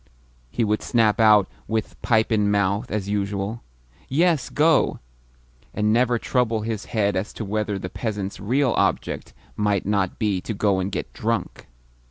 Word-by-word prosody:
he 120 - -1
would 105 0 0
snap 115 -3 +2
out, 105 -3 +6 0.2
with 110 -1 -3
pipe 110 -1 +2
in 105 -2 +2
mouth 100 +3 +1
as 105 -2 -2
usual, 100 +2 -2 0.5
"Yes, 160 -1 +2
go!" 155 -1 +3 0.8
and 105 +1 +2
never 120 +1 +3
trouble 115 -2 0
his 110 -1 -4
head 105 -3 0
as 95 +3 -2
to 110 - -5
whether 105 0 -1
the 95 - -5
peasant's 105 -1 -4
real 125 +5 +1
object - - -1 0.2
might 105 -2 0
not 100 -2 0
be 100 -4 0
to 110 - -4
go 100 -1 +1
and 95 +2 -2
get 90 - -4
drunk. - - -3
105 Hz, 160 wpm, -23 LUFS, 100-115 Hz, 0.8 s, out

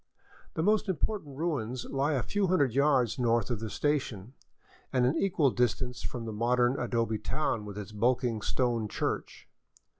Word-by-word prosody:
The 160 - 0
most 210 +1 +2
important 180 -6 -2
ruins 130 -7 -2
lie 140 +3 0
a 130 -5 0
few 200 - 0
hundred 145 -9 +2
yards 135 -3 +3
north 115 -2 +2
of 115 - -1
the 110 0 -4
station, 125 -5 -1 0.6
and 125 -2 +3
an 130 +5 +2
equal 165 -7 +2
distance 125 +1 0
from 120 -2 -5
the 110 - -4
modern 120 +3 +2
adobe 115 -2 0
town 110 -2 -1
with 105 -1 -7
its 105 0 -6
bulking 115 +1 +1
stone 120 -1 0
church. - - -3
125 Hz, 160 wpm, -30 LUFS, 115-145 Hz, 0.6 s, yards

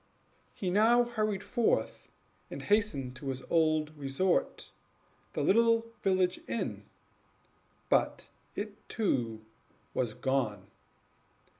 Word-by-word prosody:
He 185 -3 -2
now 225 +5 +5
hurried 215 -4 -1
forth, 240 -3 0 0.4
and - - -7
hastened 165 - +1
to 140 - -8
his 130 -1 -3
old 155 -2 +2
resort, 145 +6 0 0.6
the - - -1 0.6
village 185 -2 +2
inn 235 - -3 1.0
but - - +1 0.3
it, 210 +1 -6
too, 115 - -1 0.5
was 120 -4 -1
gone. 120 -8 -1
175 Hz, 95 wpm, -31 LUFS, 135-210 Hz, 1.0 s, now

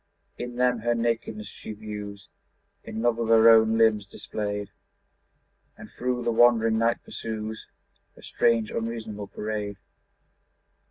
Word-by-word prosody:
In 120 0 -5
them 125 -1 +2
her 120 +2 0
nakedness 115 -2 -2
she 105 +2 -9
views, 105 -1 -8 0.6
In 110 +1 -5
love 120 -1 +2
with 115 -1 -2
her 115 0 +7
own 110 0 +6
limbs 110 -3 +3
displayed, 105 0 -5 1.1
And - - -12
through 125 0 -2
the 120 - +1
wondering 115 -1 +4
night 115 +1 +1
pursues 110 -1 -6 0.5
Her - - -17
strange 115 -2 +1
unreasonable 110 -3 -4
parade. 105 -1 -4
110 Hz, 125 wpm, -26 LUFS, 105-115 Hz, 1.1 s, her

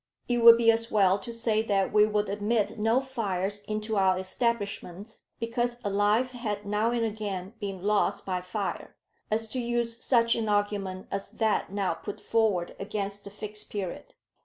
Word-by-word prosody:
It 240 -1 +1
would 230 0 +10
be 230 -1 +5
as 230 +1 -1
well 195 -2 +3
to 235 - -7
say 230 -2 +1
that 200 -3 0
we 210 0 +6
would 210 -1 0
admit 210 +2 0
no 225 +4 +3
fires 205 -7 -2
into 215 0 -2
our 190 -1 +3
establishments 200 0 -3 0.2
because 240 +1 -1
a 205 - -1
life 210 +5 +2
had 210 -5 -4
now 210 +2 +1
and 235 -1 0
again 205 -3 -4
been 195 -3 -5
lost 210 0 +1
by 185 -1 -2
fire, 190 +2 -4 0.3
as 225 +1 0
to 255 - -3
use 235 -1 -1
such 235 -2 +4
an 220 -2 -1
argument 205 -2 -1
as 195 0 -3
that 220 -3 0
now 195 -3 0
put 200 +4 -7
forward 215 -6 0
against 200 0 -4
the - - -6
Fixed 210 +1 -6
Period. 195 -4 -5
210 Hz, 175 wpm, -28 LUFS, 200-230 Hz, 0.3 s, would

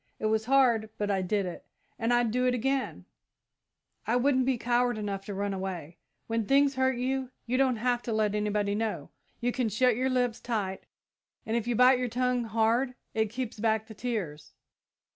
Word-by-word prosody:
It - - -4
was 220 0 +1
hard, 240 -4 +3
but 205 -1 -1
I 195 -1 +1
did 195 +2 0
it, 180 - -6 0.4
and 230 +1 0
I'd 240 -2 +3
do 250 +2 +1
it 250 - +2
again 270 +2 -1 1.0
I 230 - +2
wouldn't 260 0 +2
be 265 -2 +2
coward 240 0 +1
enough 200 -2 -4
to 205 - -5
run 200 0 -2
away. 180 -4 -5 0.3
When 225 -2 -2
things 280 0 +4
hurt 260 -1 +1
you, 260 +1 -1 0.2
you 245 - -1
don't 260 -2 +3
have 240 +2 0
to 235 - -4
let 215 -2 +1
anybody 210 -1 0
know. 220 +1 -3 0.3
You 245 +1 +1
can 245 -2 -1
shut 245 +3 +3
your 255 +3 0
lips 245 -3 0
tight, 205 -5 -3 0.6
and 220 - -1
if 235 -1 -1
you 240 - +1
bite 250 +2 +6
your 250 - 0
tongue 250 0 0
hard 230 +4 +1 0.2
it 220 -1 +1
keeps 245 -1 -5
back 220 0 +1
the 220 - -11
tears. 195 -12 -4
230 Hz, 195 wpm, -29 LUFS, 210-250 Hz, 1.0 s, bite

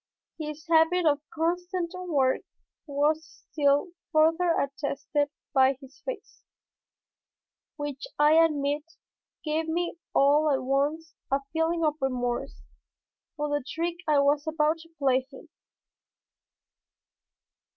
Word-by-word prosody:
His 305 0 -6
habit 330 +2 +4
of 290 -2 +3
constant 350 +2 -1
work 305 -8 +1 0.5
was 295 +2 +1 0.3
still 285 +2 +2 0.2
further 325 +2 +4
attested 285 +1 -1 0.2
by 265 -1 +5
his 275 -1 -15
face, - - -7 1.3
which 290 -2 -5
I 295 +1 +5
admit, 300 -3 +3 0.6
gave 315 +1 -1
me 340 +1 -2 0.2
all 295 +2 +4
at 265 -2 +1
once 290 +5 0 0.2
a 275 +1 +1
feeling 325 0 +1
of 305 0 +1
remorse 245 -2 -2 0.7
for 295 -1 -2
the 290 -1 -1
trick 335 +5 -3
I 300 -1 +4
was 285 +2 +2
about 315 0 +1
to 330 0 -15
play 265 -2 +2
him. 325 - -13
300 Hz, 110 wpm, -27 LUFS, 280-325 Hz, 1.3 s, by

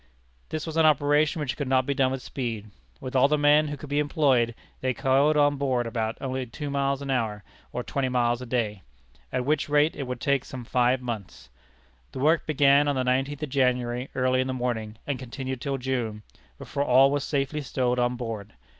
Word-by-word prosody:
This 155 - -3
was 160 -1 -5
an 160 - +5
operation 150 +1 +3
which 130 -3 -2
could 145 - -3
not 130 0 +2
be 140 - 0
done 135 -1 +2
with 130 0 -4
speed. 115 -5 -5 0.3
With 130 - -7
all 130 +1 +6
the 150 +1 +2
men 150 +1 +4
who 145 0 -5
could 150 - -9
be 145 - +2
employed, 135 -6 +2 0.2
they 130 -1 -1
coiled 140 +3 +3
on 145 -1 +3
board 130 -3 0 0.3
only 130 -1 -3
about 125 -2 -7
two 145 -2 -4
miles 140 0 0
an 140 - -3
hour, 110 -5 -1 0.3
or 125 - -3
twenty 135 0 -1
miles 120 -1 +1
a 125 - -7
day 110 -5 -1 0.5
at 125 -1 -1
which 150 +1 0
rate 150 +2 +3
it 140 - -5
would 125 -1 -4
take 140 +1 +1
some 125 -2 -8
five 125 +1 +2
months. 110 - -6 0.6
The - - -6
work 155 +4 +2
began 145 -1 +4
on 145 - +1
the 130 - 0
nineteenth 135 +3 0
of 150 - -3
January, 125 -1 0
early 130 0 +2
in 130 - -2
the 130 - -2
morning, 115 -3 -3
and 140 -3 -3
continued 130 0 -5
till 140 -2 -2
June, 120 -5 -3 0.3
before 140 - -4
all 135 +1 +5
was 145 -1 0
safely 145 +1 -1
stowed 125 -2 -1
on 125 0 +1
board. 115 -4 -6
130 Hz, 210 wpm, -26 LUFS, 125-145 Hz, 0.6 s, all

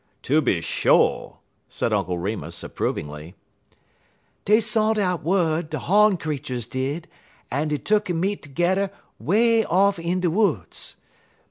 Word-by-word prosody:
"Tooby 135 - +2
sho'!" - - +2 0.3
said 115 - -1
Uncle 95 -4 0
Remus, 85 -3 -4
approvingly. 75 +4 -4 1.1
"Dey 210 +2 +5
sont 220 0 +1
out 180 -4 0
wud, 165 -2 +1
de - - -3
hawn 210 0 +3
creeturs 140 -7 -4
did, 135 +7 -3 0.4
en 145 +5 0
dey 150 0 -1
tuck'n 205 -2 0
meet 195 +3 -1
terge'er 175 +7 0 0.3
'way 225 +5 +3
off 195 +1 +2
in 170 +2 -1
de 180 -2 +1
woods. 180 - -1
170 Hz, 125 wpm, -23 LUFS, 130-200 Hz, 1.1 s, Dey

